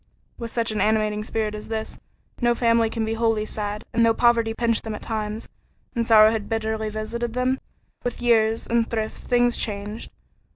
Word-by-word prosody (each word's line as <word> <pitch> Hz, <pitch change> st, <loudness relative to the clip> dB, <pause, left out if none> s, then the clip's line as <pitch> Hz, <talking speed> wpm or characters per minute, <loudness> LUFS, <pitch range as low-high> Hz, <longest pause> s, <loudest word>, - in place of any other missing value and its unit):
With 235 Hz, -1 st, -4 dB
such 230 Hz, -1 st, 0 dB
an 215 Hz, -, -1 dB
animating 215 Hz, -1 st, +1 dB
spirit 215 Hz, -1 st, -2 dB
as 210 Hz, 0 st, -7 dB
this, 220 Hz, -1 st, -4 dB, 0.4 s
no 240 Hz, 0 st, +3 dB
family 230 Hz, -1 st, +3 dB
can 225 Hz, 0 st, -2 dB
be 220 Hz, -, -1 dB
wholly 225 Hz, -1 st, +1 dB
sad, 210 Hz, 0 st, -4 dB
and 230 Hz, -, +3 dB
though 225 Hz, 0 st, +4 dB
poverty 235 Hz, -2 st, +3 dB
pinched 230 Hz, -1 st, +1 dB
them 220 Hz, -1 st, -4 dB
at -, -, -9 dB
times, 215 Hz, 0 st, -3 dB, 0.5 s
and 230 Hz, -1 st, 0 dB
sorrow 215 Hz, -1 st, +7 dB
had 220 Hz, -2 st, -3 dB
bitterly 220 Hz, -1 st, -1 dB
visited 225 Hz, +2 st, -4 dB
them, 255 Hz, +1 st, +1 dB, 0.4 s
with 245 Hz, -, -3 dB
years 225 Hz, -2 st, +3 dB
and 230 Hz, -1 st, +1 dB
thrift 220 Hz, -1 st, -3 dB
things 245 Hz, -1 st, +3 dB
changed. 210 Hz, +1 st, -4 dB
225 Hz, 180 wpm, -24 LUFS, 215-235 Hz, 0.5 s, sorrow